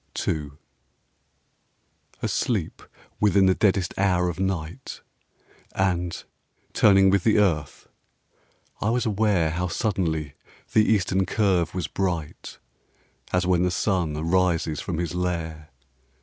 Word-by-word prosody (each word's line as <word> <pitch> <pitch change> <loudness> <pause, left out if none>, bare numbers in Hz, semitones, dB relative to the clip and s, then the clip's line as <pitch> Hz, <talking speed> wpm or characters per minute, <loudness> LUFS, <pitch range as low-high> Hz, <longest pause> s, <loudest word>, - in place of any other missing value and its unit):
TO 75 -2 -3 1.7
Asleep - - -1 0.4
within 100 -2 +4
the 95 - +5
deadest 95 -2 +1
hour 90 -2 +2
of 90 - -6
night 95 +4 -4 0.7
And, 90 -2 -1 0.5
turning 95 -2 +5
with 100 -2 +2
the 110 -1 +3
earth, 80 -8 0 0.9
I 105 - +1
was 120 +1 0
aware 100 -6 +1
How 90 +3 -2
suddenly 85 - -2 0.4
the 110 - +5
eastern 95 -3 +1
curve 95 -6 +1
was 90 -3 -2
bright, 85 -6 -4 0.7
As 90 0 +1
when 90 -1 +2
the 90 - +2
sun 90 -4 -1
arises 85 -1 0
from 90 -4 -4
his 85 -1 -2
lair. 85 -3 -3
90 Hz, 115 wpm, -24 LUFS, 85-95 Hz, 1.7 s, the